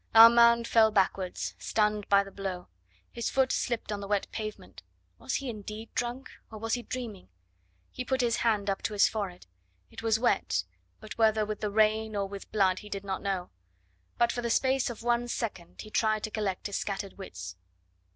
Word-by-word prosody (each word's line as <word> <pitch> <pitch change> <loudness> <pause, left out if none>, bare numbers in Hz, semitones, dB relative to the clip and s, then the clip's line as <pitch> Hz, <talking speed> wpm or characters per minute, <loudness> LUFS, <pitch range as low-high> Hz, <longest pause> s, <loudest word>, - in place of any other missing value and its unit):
Armand 235 +1 +8
fell 225 -1 +5
backwards, 190 -2 0
stunned 210 -1 0
by 200 0 +5
the 195 - -11
blow; 190 -2 -5 0.4
his 235 - -2
foot 265 -1 +2
slipped 235 -3 -1
on 205 - -2
the 200 - -6
wet 205 -1 +1
pavement. 215 -1 -7 0.4
Was - - -3
he 275 - -2
indeed 215 -1 -7
drunk, 245 +2 -3 0.2
or 220 - -9
was 225 +1 -2
he 245 - 0
dreaming? 235 - -6 0.6
He 255 - -4
put 260 +1 -1
his 235 -1 +1
hand 215 -4 +1
up 195 -1 -1
to 215 - -2
his 205 - +5
forehead; 195 -5 -4 0.5
it - - -8
was 225 -1 +2
wet, 240 +2 +1 0.4
but 215 +1 -10
whether 220 -1 +4
with 215 +1 -5
the 210 - 0
rain 215 +1 +2
or 200 -1 0
with 200 0 -9
blood 190 -3 +2
he 210 - -11
did 200 -1 -5
not 190 -1 -3
know; 190 -3 -2 0.7
but 235 0 +3
for 240 - -3
the 235 - -2
space 260 +2 +2
of 230 -1 -7
one 240 0 +1
second 220 -8 -4
he 215 - -11
tried 215 -1 +1
to 215 - -3
collect 205 -4 -2
his 200 - -2
scattered 200 0 -4
wits. 90 - -7
215 Hz, 195 wpm, -29 LUFS, 200-235 Hz, 0.7 s, Armand